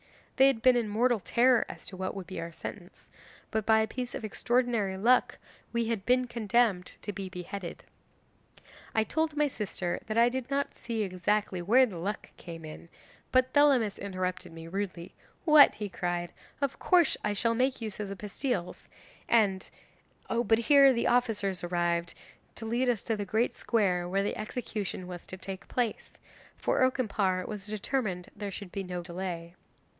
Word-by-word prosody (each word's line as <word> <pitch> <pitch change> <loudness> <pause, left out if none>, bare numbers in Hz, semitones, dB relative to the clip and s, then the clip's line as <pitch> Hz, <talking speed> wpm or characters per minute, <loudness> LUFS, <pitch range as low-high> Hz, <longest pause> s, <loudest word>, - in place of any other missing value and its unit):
They 265 0 +7
had 245 -5 +1
been 255 -1 +6
in 235 -3 0
mortal 235 +2 +2
terror 245 +5 +4
as - - -9
to 190 - -8
what 185 +1 -3
would 195 -2 -6
be 185 - -6
our 165 0 -6
sentence, 175 +2 -9 0.4
but 220 - 0
by 220 -1 +5
a 220 - 0
piece 250 +2 -5
of - - -4
extraordinary 230 -3 0
luck 240 +6 +3 0.3
we 235 0 0
had 225 -4 -1
been 250 0 +4
condemned 225 -5 +1
to 205 - -3
be 195 -1 -5
beheaded. 180 0 -7 1.1
'I 220 - +4
told 315 +6 -1
my 300 0 +3
sister 195 -8 -3
that 215 +1 -2
I 235 +1 +6
did 255 0 -4
not 280 0 -1
see 225 -2 -3
exactly 190 0 0
where 240 +9 +5
the 190 -8 -7
luck 200 +4 -4
came 165 -2 -9
in, 155 +2 -10 0.4
but 255 0 +3
Thelamis 270 -8 +4
interrupted 185 -2 -3
me 165 0 -9
rudely: 180 -1 -4 0.3
'"What!" 305 -3 +8
he 210 - -4
cried, 175 -1 -3 0.3
"of 280 -3 -2
course 350 -3 +4
I 210 - 0
shall 230 +3 +1
make 255 +3 +1
use 215 -3 -5
of 205 -2 -3
the 200 - -5
pastilles, 210 -1 -3 0.4
and 200 -5 +2 0.3
" - - -33 0.2
but 225 - +5
here 275 +3 +6
the 235 -2 0
officers 215 -7 +1
arrived 175 -1 0 0.4
to 225 - -6
lead 240 +3 +1
us 235 -5 0
to 225 - -1
the 205 -1 -3
great 220 +5 0
square 180 -6 +1
where 195 +2 +1
the 205 - -2
execution 215 -4 -4
was 180 -1 -8
to 185 - -7
take 190 0 -7
place 240 -4 -2 0.4
for - - 0
Okimpare 205 -8 +1
was 210 -2 -7
determined 210 -3 -2
there 205 -1 -4
should 195 -1 -8
be 200 - -3
no 180 -1 -5
delay. 170 -1 -5
210 Hz, 180 wpm, -29 LUFS, 185-245 Hz, 1.1 s, What